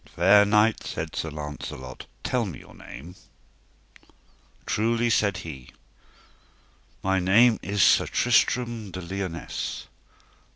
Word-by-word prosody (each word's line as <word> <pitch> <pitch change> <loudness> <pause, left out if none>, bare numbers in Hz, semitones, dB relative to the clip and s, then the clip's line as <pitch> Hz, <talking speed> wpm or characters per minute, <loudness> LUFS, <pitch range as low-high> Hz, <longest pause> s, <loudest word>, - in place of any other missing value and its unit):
Fair 100 +4 +6
knight, 105 +2 +3
said 80 0 -5
Sir 80 - -3
Launcelot, 75 -4 -8 0.2
tell 120 -4 0
me 85 - -7
your - - -15
name? 80 +8 -11 1.5
Truly, 115 +2 +1
said 100 -3 +2
he, 65 -6 -9 1.3
my 95 0 +1
name 110 +6 +4
is 100 -1 +1
Sir - - +5
Tristram 120 -4 +1
de 95 0 -7
Liones. 95 -1 -5
95 Hz, 110 wpm, -25 LUFS, 85-110 Hz, 1.5 s, Fair